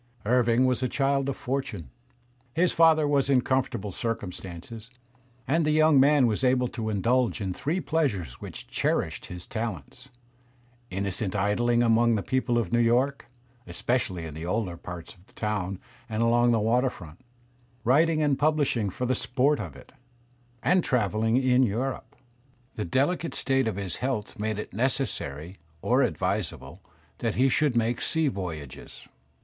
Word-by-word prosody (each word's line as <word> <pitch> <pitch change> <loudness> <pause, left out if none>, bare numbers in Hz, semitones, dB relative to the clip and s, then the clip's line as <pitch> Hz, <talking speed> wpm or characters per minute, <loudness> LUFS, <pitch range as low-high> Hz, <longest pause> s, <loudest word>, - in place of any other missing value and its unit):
Irving 120 +1 +3
was 130 -1 +1
a 130 - 0
child 140 0 +1
of 135 - -3
fortune. 110 - -4 0.6
His 175 +2 +3
father 160 -2 +4
was 140 -1 +1
in 130 -2 +4
comfort 130 0 0
able 100 0 -5
circumstances, 105 0 -6 0.6
and 160 +4 +2
the 150 - +1
young 155 -2 +5
man 140 0 +5
was 115 +2 0
able 125 -1 +3
to 110 -1 -4
indulge 120 +4 +1
in 95 -3 -2
three 155 - -2
pleasures 110 - -1
which - - -8
cherished - - -1
his 90 0 -8
talents: 110 - -6 0.8
innocent 95 +1 -2
idling 120 +4 +2
among 115 0 +4
the 100 - -2
people 130 -2 0
of 115 -5 -1
New 120 - +4
York, 125 +4 +1 0.4
especially 90 -1 -2
in 80 - -7
the 80 +2 -7
older 90 0 -2
parts 85 0 -9
of 90 +2 -24
the - - -23
town 100 -3 -2 0.3
and 110 +1 0
along 120 +1 +4
the 115 - +3
water 120 +5 +2
front; 85 -5 -12 0.6
writing 155 +5 +3
and 145 -2 +1
publishing 145 -8 +1
for 125 +7 -4
the 130 - +1
sport 130 +3 +1
of 85 -10 -6
it; 65 - -15 0.7
and 180 -1 +3
travelling 110 -1 +1
in 130 -1 +3
Europe. 125 +3 -2 0.6
The 105 - -4
delicate 145 - 0
state 135 -2 +1
of 110 - -1
his 95 -4 -3
health 125 -6 -3
made 110 0 -2
it 105 - -6
necessary, 95 - -2 0.2
or 125 +3 +3
advisable, 95 - -2 0.4
that 115 -3 -1
he 130 +2 +3
should 140 0 +2
make 120 +1 +1
sea 160 +2 +1
voyages. 80 - -7
120 Hz, 160 wpm, -27 LUFS, 100-135 Hz, 0.8 s, young